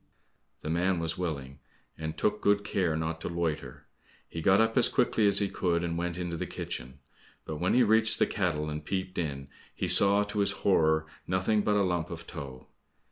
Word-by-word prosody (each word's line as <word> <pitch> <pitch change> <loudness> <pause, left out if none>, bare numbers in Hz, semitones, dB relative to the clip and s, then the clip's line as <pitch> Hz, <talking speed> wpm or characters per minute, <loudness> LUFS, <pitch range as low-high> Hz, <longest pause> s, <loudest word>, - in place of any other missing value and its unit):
The 75 - -5
man 90 +2 +1
was 85 0 -1
willing 70 -6 -4 0.4
and 80 0 -5
took 105 0 0
good 100 0 +2
care 90 -6 0
not 80 +1 -3
to - - -4
loiter. 85 -3 -3 0.4
He 80 - -6
got 95 +4 +4
up 115 0 +2
as 125 - +4
quickly 115 -4 +2
as 100 -1 +5
he 100 - +3
could, 85 -3 -1
and 85 -1 -2
went 85 0 -3
into 90 -2 -3
the - - -4
kitchen. 65 +2 -6 0.5
But 80 - -5
when 90 +8 +1
he 125 - +5
reached 110 0 +4
the - - +3
kettle 85 -7 -1
and 75 0 -5
peeped 95 +2 -3
in, 70 -5 -3 0.3
he - - -2
saw, 100 +1 +5
to 105 0 -4
his 100 - +2
horror, 80 -5 +3 0.2
nothing 95 +4 +1
but 105 0 +1
a 100 - +3
lump 90 -3 -1
of 85 -1 -8
tow. 70 -6 -8
85 Hz, 200 wpm, -29 LUFS, 80-100 Hz, 0.5 s, as